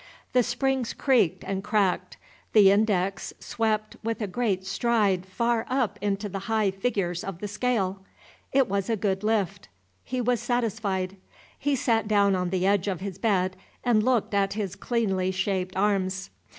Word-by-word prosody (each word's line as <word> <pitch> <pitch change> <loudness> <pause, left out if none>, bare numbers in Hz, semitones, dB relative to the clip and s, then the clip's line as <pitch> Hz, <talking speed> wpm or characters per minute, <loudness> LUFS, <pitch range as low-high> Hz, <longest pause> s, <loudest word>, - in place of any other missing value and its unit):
The 250 - +5
springs 250 +1 0
creaked 250 - +2
and 195 0 -3
cracked; 205 -3 0 0.4
the 200 -3 +7
index 195 -3 +1
swept 215 -1 -1
with 225 0 -2
a 215 - -1
great 195 -2 -1
stride 195 -3 +1
far 235 +4 0
up 240 -6 0
into 205 0 -1
the 195 0 -4
high 215 -3 +2
figures 190 -4 -1
of 195 -3 -5
the 205 - -5
scale; 205 -3 -1 0.5
it 270 -2 +3
was 195 +1 -1
a 225 - +2
good 195 -1 -1
lift. 210 - 0 0.4
He 255 0 -3
was 245 -1 +1
satisfied. 205 -6 -1 0.4
He 285 0 +1
sat 230 -4 +1
down 200 -2 +4
on 180 -1 -1
the 185 0 0
edge 200 -1 +2
of 190 -4 -1
his 195 -2 -5
bed 185 -4 +1 0.3
and 235 -4 +3
looked 240 -2 +1
at 195 -1 +2
his 205 -3 -3
cleanly 195 -6 0
shaped 185 0 -1
arms. 190 -1 0
205 Hz, 165 wpm, -26 LUFS, 190-230 Hz, 0.5 s, the